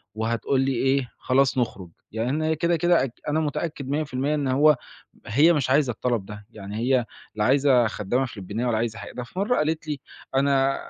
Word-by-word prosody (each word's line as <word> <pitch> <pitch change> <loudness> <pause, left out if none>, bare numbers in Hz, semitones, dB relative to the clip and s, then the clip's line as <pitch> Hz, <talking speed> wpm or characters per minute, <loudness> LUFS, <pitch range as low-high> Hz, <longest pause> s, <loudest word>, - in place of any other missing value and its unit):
وهتقول 115 +4 0
لي 135 +1 +1
إيه، 135 0 +1
خلاص 135 +1 +2
نخرج، 100 -7 -2 0.2
يعني 115 +3 -2
أنا 155 +3 0
كده 170 +2 +1
كده 175 +1 +3
أت 125 -3 -6
أنا 150 +2 +1
متأكد 150 -2 -3
مِيَّة 150 +2 0
في 140 - -13
المِيَّة 140 +4 0
إن 145 -2 -1
هو 145 +3 +4 0.5
هي 150 +11 +5
مش 140 -5 0
عايزة 135 -1 +3
الطلب 120 -2 -1
ده، 105 0 -10
يعني 105 -2 -8
هي 125 +2 +2 0.3
لا 105 -1 0
عايزة 130 -1 +4
خدّامة 110 +4 -1
فلبينية 110 0 -5
ولا 120 -2 +1
عايزة 115 0 -2
حاجة، - - -8
ده 125 - -5
في 120 - -11
مرة 210 +6 +1
قالت 155 +1 -1
لي: 145 -3 -3 0.3
"أنا 135 0 +3
135 Hz, 205 wpm, -24 LUFS, 115-150 Hz, 0.5 s, هي